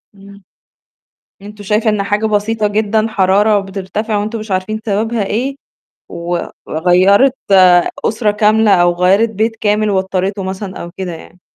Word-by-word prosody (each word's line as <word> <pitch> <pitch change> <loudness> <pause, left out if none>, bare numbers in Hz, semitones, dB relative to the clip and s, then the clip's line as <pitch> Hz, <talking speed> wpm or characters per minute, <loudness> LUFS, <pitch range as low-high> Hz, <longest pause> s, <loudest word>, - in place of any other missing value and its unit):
إمم، 200 0 -16 1.0
أنتم 210 0 -11
شايفة 215 +2 +1
إن 205 -1 -1
حاجة 205 +2 -1
بسيطة 215 +1 0
جدًا 215 +1 0
حرارة 205 +1 +2
بترتفع 195 +3 -4
وأنتم 215 +3 -3
مش 215 -1 -9
عارفين 190 +4 -2
سببها 220 +1 -1
إيه 260 +7 -2 0.5
و 170 +1 -3 0.3
وغيّرِت 185 - +3 0.7
أسرة 220 0 0
كاملة 215 +1 +2
أو 175 0 +3
غيّرِت 195 +6 +2
بيت 220 +2 -2
كامل 210 0 0
واضطريته 190 +1 -1
مثلًا 190 0 -6
أو 170 - -8
كده 185 -2 -4
يعني. 170 +2 -13
205 Hz, 140 wpm, -15 LUFS, 190-215 Hz, 1.0 s, وغيّرِت